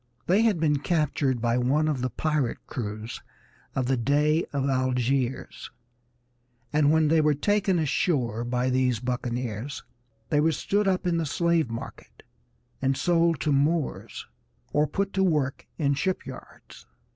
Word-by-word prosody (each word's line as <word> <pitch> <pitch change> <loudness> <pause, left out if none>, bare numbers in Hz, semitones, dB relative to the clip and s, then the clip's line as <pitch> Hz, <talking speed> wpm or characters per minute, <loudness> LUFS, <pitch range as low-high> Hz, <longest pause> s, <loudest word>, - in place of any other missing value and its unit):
They 190 +5 +3
had 220 -7 +2
been 150 -3 +2
captured 145 -5 0
by 120 +1 +2
one 140 +5 +2
of 145 -5 -1
the 130 - 0
pirate 150 0 -1
crews 110 -1 -5 0.5
of 130 - 0
the 130 +1 +1
Dey 150 +6 +2
of 140 -1 -1
Algiers, 130 0 -1 1.0
and 150 -1 +4
when 160 -1 +3
they 160 0 +4
were 150 -1 +3
taken 200 +3 +1
ashore 135 - 0
by 125 +1 0
these 125 -3 +1
buccaneers 125 0 -3 0.5
they 145 - +2
were 160 +2 +3
stood 205 +4 0
up 185 -1 +1
in 175 -2 +1
the 165 -2 -1
slave 170 -2 +1
market 115 0 -9 0.6
and 135 0 +1
sold 170 -2 +2
to 155 - +1
Moors, 145 +2 0 0.5
or 150 +1 +3
put 200 +4 -2
to 190 - +2
work 150 -7 0
in 140 -3 +1
the 140 - 0
shipyards. 180 -9 -6
145 Hz, 150 wpm, -26 LUFS, 125-165 Hz, 1.0 s, and